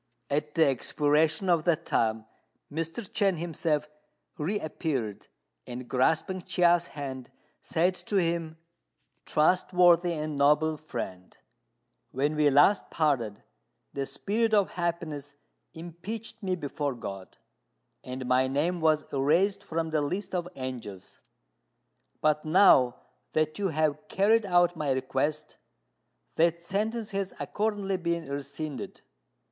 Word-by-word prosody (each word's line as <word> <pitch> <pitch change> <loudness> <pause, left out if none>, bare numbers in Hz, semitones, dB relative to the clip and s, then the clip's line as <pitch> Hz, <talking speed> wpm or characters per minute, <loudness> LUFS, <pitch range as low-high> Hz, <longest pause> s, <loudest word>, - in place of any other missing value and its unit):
At 150 +1 -1
the 165 -1 +5
expiration 150 - +1
of 170 -3 +3
that 170 -4 +1
time 110 -1 0 0.5
Mr. 165 +7 -4
Chên 195 -3 +1
himself 155 -2 -1 0.5
reappeared, 150 - -3 0.4
and, 125 0 -7
grasping 160 +9 +1
Chia's 175 -1 +3
hand, 130 -3 -6 0.3
said 175 +3 +1
to 205 - -2
him, 165 -3 0 0.7
"Trustworthy 175 +1 +4
and 155 -1 -3
noble 150 +2 +3
friend, 95 -11 -7 0.7
when 145 +4 -1
we 150 -1 +4
last 145 +9 +4
parted 135 -10 0 0.5
the 135 -1 -3
Spirit 220 +2 0
of 200 -2 +2
Happiness 160 -5 -3 0.4
impeached 185 +8 -7
me 185 -2 -1
before 145 -4 -3
God, 95 -5 -8 0.7
and 130 0 -6
my 130 +1 +3
name 160 +6 0
was 155 -1 +3
erased 165 +9 +2
from 160 0 -3
the 155 -1 +1
list 185 +9 -3
of 175 -1 -1
angels. 120 -8 -7 1.0
But 150 0 +2
now 155 -7 +5 0.4
that 155 +3 0
you 200 - +1
have 155 -3 -1
carried 210 +2 +3
out 175 -1 +3
my 150 -3 -2
request, 130 +3 -2 0.8
that 170 +1 +3
sentence 215 +6 -2
has 195 -1 -3
accordingly 205 -2 -1
been 170 -1 -2
rescinded. 140 0 -6
155 Hz, 120 wpm, -28 LUFS, 140-180 Hz, 1.0 s, the